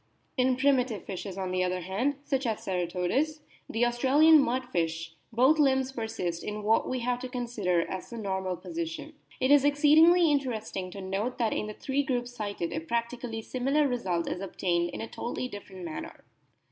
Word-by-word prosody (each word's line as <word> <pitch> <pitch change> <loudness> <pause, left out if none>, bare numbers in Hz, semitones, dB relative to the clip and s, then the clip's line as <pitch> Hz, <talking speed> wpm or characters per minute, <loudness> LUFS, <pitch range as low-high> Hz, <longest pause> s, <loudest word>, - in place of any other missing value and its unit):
In 255 -1 +2
primitive 260 -5 +2
fishes, 190 0 -6
on 190 -1 -3
the 185 0 +1
other 180 0 -1
hand, 205 +11 -1
such 270 -3 -1
as 220 -2 -2
Cera 180 -2 -1
todus, 270 - -1 0.3
the 230 +2 +2
Australian 275 +6 +5
mudfish, 170 - -1 0.2
both 260 +7 +4
limbs 265 -2 +3
persist 220 -9 -3
in 210 0 -4
what 220 +2 +2
we 255 -1 -2
have 245 +1 0
to 255 - -6
consider 230 -8 0
as 185 - -6
the 235 - -7
normal 190 -3 -2
position. 325 - -5 0.3
It 260 +2 +2
is 290 -2 +7
exceedingly 310 +4 +6
interesting 220 -9 -2
to 195 +2 -8
note 195 +6 -2
that 230 -3 +1
in 210 - -2
the 215 - -7
three 275 +1 -1
groups 245 -3 -2
cited 205 -7 -3
a - - -1
practically 235 +4 -3
similar 275 +5 +1
result 190 -10 -1
is 180 - -3
obtained 175 -2 0
in - - -6
a 225 - -4
totally 245 +2 -4
different 195 -5 -9
manner. 160 -2 -7
235 Hz, 180 wpm, -29 LUFS, 190-265 Hz, 0.3 s, is